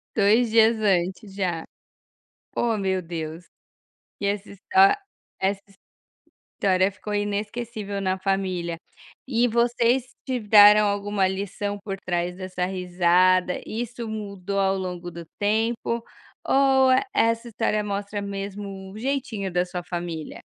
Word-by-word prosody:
2 220 +3 +4
dias 225 0 +5
antes 190 -1 0
já. 175 -4 -2 0.9
Ó 230 -2 +1
meu 190 -2 0
Deus, 165 0 -6 0.7
que 200 - -2
essa 205 0 -2
hista 380 - +4 0.4
que 190 - +2
essa 200 0 0 1.0
história 190 0 +3
ficou 210 +2 -6
inesquecível 205 0 -3
na 190 -1 0
família. 185 -3 -1 0.5
E 240 -2 +2
vocês 235 +2 +2 0.2
tiveram 210 -4 +6
alguma 200 -1 0
lição 200 +1 -3
por 195 -2 -3
trás 175 -1 -2
dessa 185 -1 -3
risada, 180 0 +2
isso 235 +1 -5
mudou 200 -3 -4
ao 195 0 +2
longo 180 -2 -5
do 170 0 -9
tempo, 225 +2 0 0.4
ou 265 -1 +4
e 255 - +4
essa 230 - +2
história 215 -1 0
mostra 205 0 -3
mesmo 195 -1 -6
o 210 - -9
jeitinho 240 -7 -2
da 180 0 +2
sua 180 0 -5
família? 170 -3 -5
200 Hz, 125 wpm, -24 LUFS, 185-220 Hz, 1.0 s, tiveram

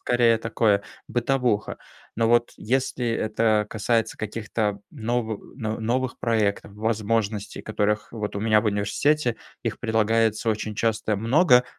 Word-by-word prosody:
скорее, 120 -2 +3
такое, 110 -2 +1 0.3
бытовуха. 120 -3 0 0.4
Но, 115 0 +1
вот, 120 0 +3
если 125 +1 -1
это 110 -1 +1
касается 115 +1 0
каких-то 105 -1 -2
новы 115 -4 -2 0.2
но 110 -2 -3
новых 125 +3 -1
проектов, 105 -4 0
возможностей, 110 -1 -1
которых 105 0 -1
вот 105 -3 -4
у - - -2
меня 110 -1 +4
в 115 - -3
университете, 115 +6 +1 0.3
их - - -3
предлагается 110 0 +2
очень 110 0 -3
часто 110 -1 0
много, 125 - +5
110 Hz, 125 wpm, -25 LUFS, 105-120 Hz, 0.4 s, много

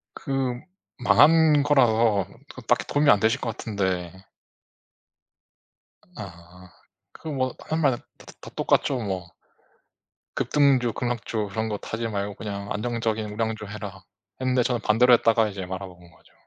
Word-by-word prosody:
그 135 -4 -2 0.4
망한 150 +3 +5
거라서 115 -8 +3 0.3
그 130 - -10
딱히 120 +2 +1
도움이 145 0 +3
안 100 - +5
되실 115 +5 +2
것 115 -3 -4
같은데 95 -5 -2 2.0
아. 90 -2 -11 0.4
그 160 - -10
뭐 130 -3 -1
사람마다 150 -6 +1 0.2
다 - - -16
다 - - -12
다 - - -10
똑같죠 135 -3 +1
뭐. 95 -6 -4 1.1
"급등주, 135 -5 +2
급락주 115 -3 -3
그런 110 +2 -2
것 105 0 -6
하지 115 +1 -2
말고 100 -2 -3
그냥 100 -1 -6
안정적인 110 -1 -2
우량주 110 -1 -3
해라." 100 -2 -8 0.3
근데 130 -1 +1
저는 120 -1 -1
반대로 120 +4 +4
했다가 115 -1 +3
이제 95 -2 -6
말아먹은 90 -2 -8
거죠. - - -24
110 Hz, 275 characters per minute, -25 LUFS, 100-125 Hz, 2.0 s, 망한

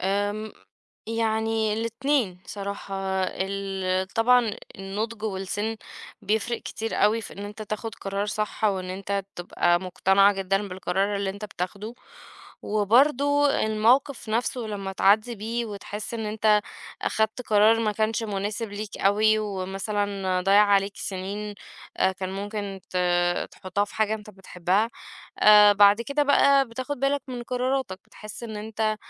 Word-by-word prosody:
آمم، 205 +3 -1 0.5
يعني 220 -1 0
الاتنين 230 -2 -1
صراحة. 200 -1 -6 0.3
ال 190 -1 -2
طبعًا 230 0 +3 0.2
النضج 210 +3 -4
والسن 205 +2 -3 0.5
بيفرق 220 +3 0
كتير 225 0 -4
أوي 215 +2 +3
في - - -9
إن 200 - -7
أنت 210 +1 -7
تاخد 215 +1 -5
قرار 200 +1 -3
صح 210 +1 -3
أو 200 -3 +2
إن 185 0 -6
أنت 195 +1 -3 0.2
تبقى 175 0 +1
مقتنع 190 +2 +3
جدًا 195 +1 -1
بالقرار 190 +2 -1
اللي 200 -1 -1
أنت 200 +2 -8
بتاخده. 205 +3 -5 0.7
وبرضو 275 +7 +3
الموقف 235 +2 +2
نفسه 235 +3 -1
لما 205 -4 -4
تعدّي 215 +5 +3
بيه 230 +3 -3
وتحس 210 +2 -6
إن 225 -2 -3
أنت 210 0 +3 0.4
أخدت 220 +3 0
قرار 220 0 +4
ما 215 -2 +1
كانش 220 +2 0
مناسب 210 +1 -3
ليك 205 0 -6
أوي، 215 +2 +3
ومثلًا 195 -1 -2
ضيّع 195 +3 +5
عليك 200 0 +2
سنين، 200 +2 -5 0.4
آآ، 190 - +2
كان 185 0 -5
ممكن 200 0 -5
ت - - -4 0.6
تحطها 190 +2 -2
في - - -14
حاجة 220 0 +1
أنت 215 -1 -9
بتحبها، 190 +2 -1 0.5
آآ، 210 -1 +8
بعد 205 +1 +6
كده 280 +5 0
بقى 280 -2 +4
بتاخد 255 +4 -5
بالك 275 0 +1
من 245 -2 -5
قراراتك، 250 -5 -2
بتحس 215 +2 -11
إن 220 -2 -6
أنت، 215 0 -2
210 Hz, 140 wpm, -25 LUFS, 195-225 Hz, 0.7 s, آآ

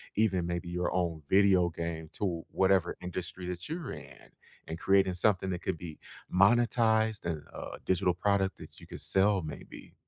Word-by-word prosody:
even 95 -5 +2
maybe 85 0 -3
your 90 0 -1
own 85 -3 -1
video 95 -3 +5
game 80 -1 -5
to 85 -5 -2
whatever 95 -2 +2
industry 90 0 -5
that 90 -1 -5
you're 160 -2 -5
in - - -11 0.4
and 80 +1 -5
creating 95 -1 +3
something 95 0 +2
that 90 -1 -3
could 85 - -2
be 80 -2 -9 0.3
monetized 110 +1 +3
and 80 -3 -3
a - - -7
digital 95 -1 +2
product 95 +1 +1
that - - -12
you - - -13
could - - -7
sell 95 0 +3
maybe. 80 -2 -9
90 Hz, 165 wpm, -30 LUFS, 85-100 Hz, 0.4 s, video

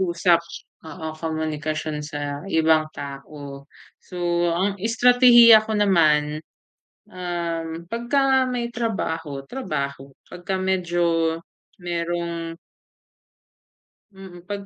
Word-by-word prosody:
usap, 170 -1 +2 0.4
oo 160 -1 -7
komunikasyon 155 -1 -3
sa 145 -1 -5
ibang 160 -1 +3
tao. 140 0 -9 0.4
So, 175 -1 -1
ang 195 +3 0
estratehiya 235 -1 +7
ko 220 - -4
naman, 155 -6 +2 0.7
um, 170 -2 -4
pagka 260 +3 +1
may 245 -1 -2
trabaho, 160 - -3
trabaho 140 - -5 0.2
pagka 180 +2 -4
medyo 175 -3 0 0.5
mayrong 170 -1 -3 1.6
Mm, 190 -2 -12
pag 200 -1 -5
170 Hz, 85 wpm, -23 LUFS, 155-195 Hz, 1.6 s, estratehiya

